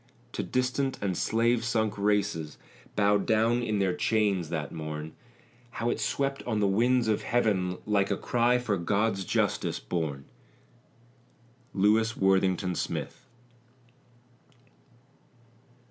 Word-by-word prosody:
To -, -, -3 dB
distant 130 Hz, +1 st, -1 dB
and 95 Hz, -3 st, -1 dB
slave 115 Hz, +5 st, +1 dB
sunk 110 Hz, -2 st, 0 dB
races, 100 Hz, -6 st, 0 dB, 0.4 s
Bowed 100 Hz, -1 st, +2 dB
down 115 Hz, +2 st, +3 dB
in 110 Hz, -3 st, -1 dB
their 95 Hz, -2 st, +1 dB
chains 100 Hz, -5 st, +1 dB
that 80 Hz, -4 st, -3 dB
morn, 75 Hz, 0 st, -6 dB, 0.6 s
How 120 Hz, +1 st, 0 dB
it -, -, -3 dB
swept 135 Hz, 0 st, -1 dB
on 110 Hz, -3 st, 0 dB
the 105 Hz, -, +2 dB
winds 120 Hz, +5 st, +2 dB
of 110 Hz, -1 st, +1 dB
heaven, 95 Hz, -7 st, 0 dB
Like 100 Hz, -2 st, +1 dB
a 100 Hz, -, 0 dB
cry 120 Hz, +1 st, +2 dB
for 115 Hz, -5 st, -1 dB
God's 100 Hz, +3 st, 0 dB
justice -, -, 0 dB
born! 70 Hz, 0 st, -3 dB, 1.5 s
LEWIS 110 Hz, +3 st, +3 dB
WORTHINGTON 95 Hz, -1 st, +2 dB
SMITH. 125 Hz, +8 st, -4 dB
105 Hz, 115 wpm, -28 LUFS, 95-115 Hz, 1.5 s, down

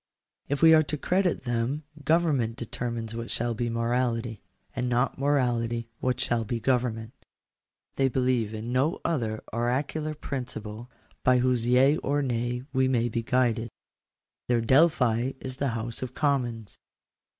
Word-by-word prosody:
If 145 Hz, +1 st, -1 dB
we 160 Hz, 0 st, +9 dB
are 155 Hz, -, +7 dB
to 150 Hz, 0 st, -3 dB
credit 180 Hz, 0 st, +1 dB
them 120 Hz, +4 st, -1 dB, 0.2 s
government 145 Hz, -7 st, +2 dB
determines 115 Hz, -2 st, -4 dB
what 115 Hz, +1 st, -5 dB
shall 120 Hz, 0 st, 0 dB
be 120 Hz, +1 st, -2 dB
morality; 115 Hz, -1 st, -1 dB, 0.3 s
and 125 Hz, 0 st, -1 dB
not 125 Hz, +2 st, 0 dB
morality 120 Hz, -5 st, 0 dB
what 125 Hz, -1 st, 0 dB
shall 120 Hz, -3 st, 0 dB
be 115 Hz, +2 st, -3 dB
government. 120 Hz, -2 st, 0 dB, 0.8 s
They 135 Hz, -, +3 dB
believe 125 Hz, -4 st, +1 dB
in 110 Hz, +2 st, -5 dB
no 140 Hz, +6 st, +1 dB
oracular 130 Hz, +3 st, -1 dB
principle 120 Hz, -5 st, -6 dB, 0.3 s
by 125 Hz, 0 st, +5 dB
whose 125 Hz, -2 st, +1 dB
yea 130 Hz, +4 st, +5 dB
or 145 Hz, +1 st, 0 dB
nay 120 Hz, -1 st, -2 dB
we 130 Hz, -1 st, +3 dB
may 120 Hz, -2 st, +1 dB
be 115 Hz, +1 st, -1 dB
guided: 120 Hz, -1 st, +1 dB, 0.8 s
their 120 Hz, -1 st, +2 dB
Delphi 130 Hz, -2 st, +3 dB
is 130 Hz, 0 st, -6 dB
the 140 Hz, -, 0 dB
House 115 Hz, +1 st, -4 dB
of 130 Hz, -1 st, -5 dB
Commons. 120 Hz, -7 st, -1 dB
125 Hz, 140 wpm, -27 LUFS, 115-135 Hz, 0.8 s, we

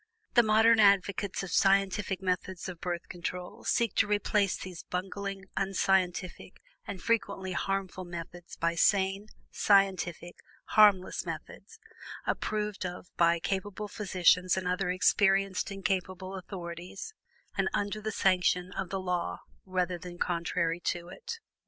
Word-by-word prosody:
The 240 Hz, -, +7 dB
modern 220 Hz, +1 st, +5 dB
advocates 200 Hz, -1 st, +3 dB
of 190 Hz, -, -6 dB
scientific 195 Hz, 0 st, +2 dB
methods 185 Hz, 0 st, -2 dB
of 180 Hz, -3 st, -8 dB
Birth 175 Hz, -1 st, -3 dB
Control 180 Hz, 0 st, -6 dB
seek 235 Hz, -4 st, +1 dB
to 210 Hz, -, +4 dB
replace 205 Hz, -1 st, +1 dB
these 180 Hz, -3 st, -8 dB
bungling, 195 Hz, +1 st, -4 dB
unscientific, 190 Hz, -1 st, 0 dB, 0.3 s
and 200 Hz, -2 st, -5 dB
frequently 200 Hz, -3 st, -1 dB
harmful 190 Hz, 0 st, -2 dB
methods 175 Hz, 0 st, -8 dB
by 170 Hz, 0 st, 0 dB
sane, 195 Hz, +3 st, +2 dB, 0.2 s
scientific, 190 Hz, -4 st, +2 dB, 0.3 s
harmless 205 Hz, -4 st, +5 dB
methods, 455 Hz, -, -8 dB, 0.5 s
approved 210 Hz, -2 st, -2 dB
of 180 Hz, 0 st, -7 dB
by 170 Hz, 0 st, +4 dB
capable 200 Hz, +3 st, -3 dB
physicians 185 Hz, -3 st, +2 dB
and 185 Hz, -1 st, -2 dB
other 180 Hz, 0 st, 0 dB
experienced 195 Hz, +2 st, +2 dB
and 195 Hz, -1 st, -8 dB
capable 185 Hz, 0 st, -2 dB
authorities, 180 Hz, -, -7 dB, 0.4 s
and -, -, +1 dB
under 205 Hz, +1 st, -2 dB
the 220 Hz, +1 st, -2 dB
sanction 180 Hz, -2 st, +2 dB
of 180 Hz, -, -4 dB
the 195 Hz, -, -2 dB
law 180 Hz, -2 st, -2 dB, 0.3 s
rather 180 Hz, -1 st, -1 dB
than 175 Hz, 0 st, -9 dB
contrary 170 Hz, -1 st, -1 dB
to 175 Hz, 0 st, -3 dB
it. 460 Hz, -, -7 dB
190 Hz, 130 wpm, -30 LUFS, 180-200 Hz, 0.5 s, The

